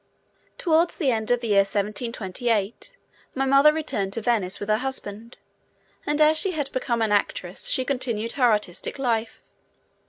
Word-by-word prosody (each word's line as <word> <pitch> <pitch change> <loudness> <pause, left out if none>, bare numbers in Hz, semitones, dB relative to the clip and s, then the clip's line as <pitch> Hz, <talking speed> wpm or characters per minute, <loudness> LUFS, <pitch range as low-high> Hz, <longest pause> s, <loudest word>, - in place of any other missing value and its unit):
Towards 335 0 +2
the 280 -7 +1
end 220 -2 -2
of 245 0 +2
the 230 - -3
year 205 - +3
1728 210 +1 -2 0.4
my 270 0 0
mother 275 +3 +6
returned 205 -11 -3
to 230 - -2
Venice 210 -5 0
with 205 - -5
her 215 0 +2
husband, 235 -4 -5 0.7
and 295 +1 0
as 310 +1 +5
she 385 -2 0
had 290 -4 -3
become 240 -3 -1
an 215 - 0
actress 195 -3 -1
she 260 - 0
continued 235 -5 -2
her 250 -4 +3
artistic 210 -1 -2
life. 230 -4 -2
235 Hz, 160 wpm, -24 LUFS, 210-270 Hz, 0.7 s, mother